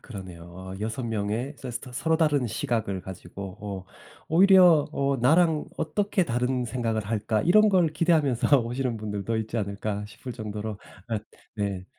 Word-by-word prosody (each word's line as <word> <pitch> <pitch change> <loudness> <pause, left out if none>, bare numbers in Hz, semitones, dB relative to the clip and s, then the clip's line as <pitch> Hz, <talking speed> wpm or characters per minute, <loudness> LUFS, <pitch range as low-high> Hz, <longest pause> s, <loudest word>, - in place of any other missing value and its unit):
그러네요. 95 -3 -9
6 110 +4 -3
명의 115 +5 -2
서스 125 -2 -5
터 125 - -11
서로 160 +6 +1
다른 150 -5 +2
시각을 110 -6 -2
가지고 95 +1 -8
어 100 -3 -6 0.4
'오히려 180 -3 +6
어 140 0 +1
"나랑 155 +5 +3
어떻게 195 +4 0
다른 125 +1 0
생각을 115 -3 -2
할까?" 110 0 0
이런 215 +5 +5
걸 185 -5 +4
기대하면서 145 -6 +3
오시는 120 +1 -2
분들도 105 +1 -3
있지 110 +1 -3
않을까?' 100 0 -3
싶을 110 +4 -9
정도로 105 -2 -5 0.3
엇 110 -3 -2 0.3
네 100 -3 -2
115 Hz, 310 characters per minute, -26 LUFS, 105-145 Hz, 0.4 s, 오히려